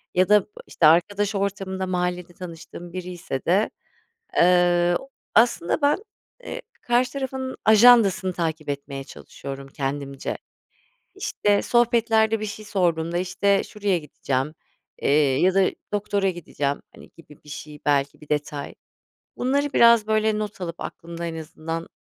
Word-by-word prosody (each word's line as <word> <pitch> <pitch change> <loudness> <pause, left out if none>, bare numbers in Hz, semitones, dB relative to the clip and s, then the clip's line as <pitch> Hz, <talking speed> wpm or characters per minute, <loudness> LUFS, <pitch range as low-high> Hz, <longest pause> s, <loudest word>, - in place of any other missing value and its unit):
ya 185 0 +3
da 210 0 +5 0.2
işte 165 - +1
arkadaş 200 +6 +3
ortamında, 195 -1 -2
mahallede 180 -1 -2
tanıştığım 170 0 -10
biriyse 180 -6 -5
de, 195 +5 +3 0.7
eee, 175 0 +4 0.4
aslında, 230 - +3
ben, 285 +1 +4 0.5
eee, - - -6 0.2
karşı 245 +1 +1
tarafın 265 -1 -4
ajandasını 215 -4 +6
takip 160 -3 -3
etmeye 140 -1 -4
çalışıyorum 135 0 -9
kendimce. 140 0 -4 0.8
İşte 205 -1 +1
sohbetlerde, 225 -2 +3
bir 215 - -3
şey 215 +1 -7
sorduğumda, 170 -4 0
işte, 195 +2 +1
şuraya 205 -3 -1
gideceğim, 145 -1 -3 0.5
eee, - - +2 0.3
ya 185 +1 +4
da 195 -1 +5 0.3
doktora 200 -1 0
gideceğim 145 -5 -3
hani - - -14
gibi 150 -3 -17
bir 150 - -15
şey 150 +1 -8
belki 140 -1 +1
bir 150 - -15
detay. 150 -1 -3 0.6
Bunları 280 +3 0
biraz 235 -2 +6
böyle 215 0 +2
not 210 -2 -5
alıp 170 -2 -5
aklımda 170 0 -6
en 165 -1 -4
azından 165 +1 -6
180 Hz, 130 wpm, -24 LUFS, 160-210 Hz, 0.8 s, ajandasını